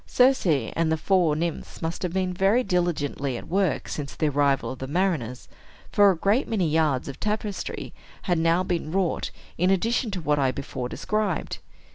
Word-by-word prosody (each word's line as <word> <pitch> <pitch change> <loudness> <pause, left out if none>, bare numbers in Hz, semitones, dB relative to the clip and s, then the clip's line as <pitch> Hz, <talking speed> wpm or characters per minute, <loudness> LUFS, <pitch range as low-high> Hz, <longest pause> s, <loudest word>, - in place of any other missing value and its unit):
Circe 255 -4 +4
and 160 +1 +1
the 160 - +2
four 175 -2 +2
nymphs 165 +1 -3
must 165 +1 -3
have 180 - -1
been 185 0 -1
very 195 +7 +3
diligently 150 - -1
at - - -9
work 185 -4 0
since 145 -2 -5
the 155 - +1
arrival 140 -1 +1
of 130 - -8
the 130 - -5
mariners; 150 -7 -1 0.4
for 205 -1 +6
a 185 - +1
great 205 - +2
many 195 -7 +1
yards 155 -4 +1
of 140 - -7
tapestry 210 -1 -3 0.3
had 175 -4 +1
now 165 +2 +3
been 170 -4 -2
wrought, 185 -2 0 0.3
in 180 +2 +3
addition 225 +5 +1
to 195 -3 -3
what 150 -3 +1
I 135 -2 +3
before 130 -1 -5
described. 210 -2 -2
170 Hz, 180 wpm, -25 LUFS, 150-195 Hz, 0.4 s, for